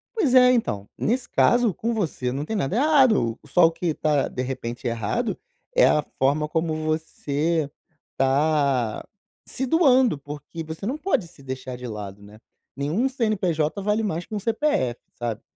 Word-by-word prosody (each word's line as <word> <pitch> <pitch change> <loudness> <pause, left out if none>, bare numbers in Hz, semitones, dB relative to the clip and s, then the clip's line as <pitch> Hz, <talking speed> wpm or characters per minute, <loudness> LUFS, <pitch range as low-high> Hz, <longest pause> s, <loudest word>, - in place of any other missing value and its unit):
Pois 295 - +2
é, 250 0 +8
então, 105 - -1
nesse 245 +2 0
caso, 240 -4 +3
com 230 +7 -2
você, 160 - -2
não 140 +3 -3
tem 220 - -3
nada 180 -2 -1
errado, 255 - +3
só 170 +4 +4
o 165 - +4
que 165 0 -2
tá, 150 -2 +1
de 125 - -4
repente 125 -2 -5
errado, 110 -3 -1 0.4
é - - +6
a 150 - +3 0.2
forma 145 +3 +2
como 160 0 0
você 155 -1 -1 0.5
tá 135 -4 +1 0.4
se 265 - -3
doando, 260 - +4
porque, 145 +3 -8
você 160 +4 -7
não 260 +7 -2
pode 310 - 0
se 155 - -17
deixar 130 -1 -6
de 125 0 -7
lado, 105 -3 -7
né, 105 +1 -14 0.4
nenhum 155 - 0
CNPJ, 200 - 0
vale 210 +2 +1
mais 175 -4 -2
que 215 - -7
que 205 - -3
CPF, 220 - 0 0.2
sabe? 115 -2 -4
160 Hz, 165 wpm, -24 LUFS, 135-225 Hz, 0.5 s, é